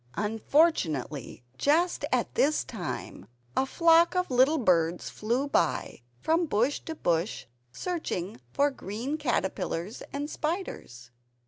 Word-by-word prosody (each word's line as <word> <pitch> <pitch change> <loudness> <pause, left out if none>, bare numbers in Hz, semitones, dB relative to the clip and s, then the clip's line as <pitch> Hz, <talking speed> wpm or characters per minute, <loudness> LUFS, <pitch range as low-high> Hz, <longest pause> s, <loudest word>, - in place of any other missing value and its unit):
Unfortunately, 205 - +1 0.2
just 335 +5 +2
at - - 0
this 300 +2 +2
time 185 -8 -6 0.3
a 265 - +2
flock 335 +3 +4
of 360 -5 0
little 260 +5 +4
birds 175 - +1
flew 240 +6 -1
by, 165 - 0 0.2
from 330 - +1
bush 245 +3 +1
to 320 - -7
bush, 170 - -1 0.3
searching 225 - -4
for 285 +1 +2
green 240 +4 -4
caterpillars 190 - -2
and 285 +1 -3
spiders. 300 - -4
255 Hz, 115 wpm, -28 LUFS, -, 0.3 s, flock